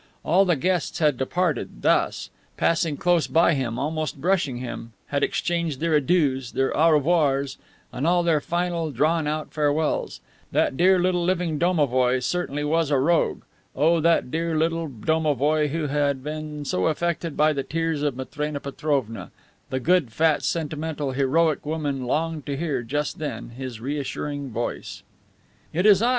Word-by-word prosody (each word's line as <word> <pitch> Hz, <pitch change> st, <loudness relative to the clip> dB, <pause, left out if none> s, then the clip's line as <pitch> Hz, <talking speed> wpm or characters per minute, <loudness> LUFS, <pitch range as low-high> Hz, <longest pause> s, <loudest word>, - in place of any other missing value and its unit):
All 185 Hz, +5 st, +4 dB
the 175 Hz, -3 st, +3 dB
guests 175 Hz, +3 st, -1 dB
had 150 Hz, -4 st, +3 dB
departed 140 Hz, -, -2 dB
thus, -, -, +1 dB, 0.3 s
passing 165 Hz, -3 st, +1 dB
close 175 Hz, 0 st, +2 dB
by 165 Hz, +1 st, +4 dB
him, 125 Hz, -5 st, -2 dB
almost 155 Hz, +2 st, -2 dB
brushing 170 Hz, -6 st, +1 dB
him, 120 Hz, -2 st, -7 dB, 0.2 s
had 140 Hz, -1 st, 0 dB
exchanged 170 Hz, -5 st, -1 dB
their 165 Hz, 0 st, 0 dB
"Adieus," 140 Hz, -4 st, +2 dB
their 135 Hz, 0 st, 0 dB
"Au 165 Hz, +2 st, +5 dB
revoirs," 145 Hz, -3 st, +1 dB, 0.3 s
and 135 Hz, +6 st, -1 dB
all 175 Hz, 0 st, +3 dB
their 165 Hz, -3 st, +2 dB
final, 170 Hz, 0 st, -1 dB
drawn 150 Hz, +4 st, +1 dB
out 155 Hz, +1 st, -3 dB
farewells. 150 Hz, +1 st, 0 dB, 0.3 s
That -, -, +1 dB
dear 185 Hz, +5 st, +5 dB
little 180 Hz, -1 st, +1 dB
living 175 Hz, -4 st, 0 dB
domovoi 130 Hz, -8 st, +2 dB
certainly 150 Hz, -4 st, -2 dB
was 160 Hz, +1 st, +1 dB
a 145 Hz, -, +3 dB
rogue! 165 Hz, +6 st, +1 dB, 0.3 s
Oh, 165 Hz, +4 st, +3 dB
that 165 Hz, -5 st, +2 dB
dear 165 Hz, 0 st, -1 dB
little 165 Hz, +1 st, 0 dB
domovoi 150 Hz, +3 st, +1 dB
who 155 Hz, +2 st, -2 dB
had 140 Hz, -2 st, 0 dB
been 150 Hz, 0 st, -5 dB
so 90 Hz, -8 st, 0 dB
affected 170 Hz, 0 st, -2 dB
by 155 Hz, 0 st, +4 dB
the 140 Hz, -, -1 dB
tears 165 Hz, +1 st, -2 dB
of 145 Hz, -3 st, 0 dB
Matrena 145 Hz, +3 st, -4 dB
Petrovna! 140 Hz, -5 st, -2 dB, 0.4 s
The 130 Hz, -, -1 dB
good, 165 Hz, -3 st, +2 dB
fat, 155 Hz, +5 st, +2 dB
sentimental, 155 Hz, -3 st, -2 dB
heroic 145 Hz, +4 st, +1 dB
woman 145 Hz, -4 st, -2 dB
longed 155 Hz, +3 st, -2 dB
to 140 Hz, -1 st, -2 dB
hear, 145 Hz, -5 st, -1 dB
just 145 Hz, +8 st, -3 dB
then, 145 Hz, -8 st, -5 dB
his 125 Hz, -2 st, -7 dB
reassuring 145 Hz, +1 st, -4 dB
voice. 120 Hz, +1 st, -5 dB, 0.7 s
"It 180 Hz, +5 st, 0 dB
is 205 Hz, -2 st, +6 dB
I. 235 Hz, -, +3 dB
150 Hz, 160 wpm, -24 LUFS, 140-165 Hz, 0.7 s, is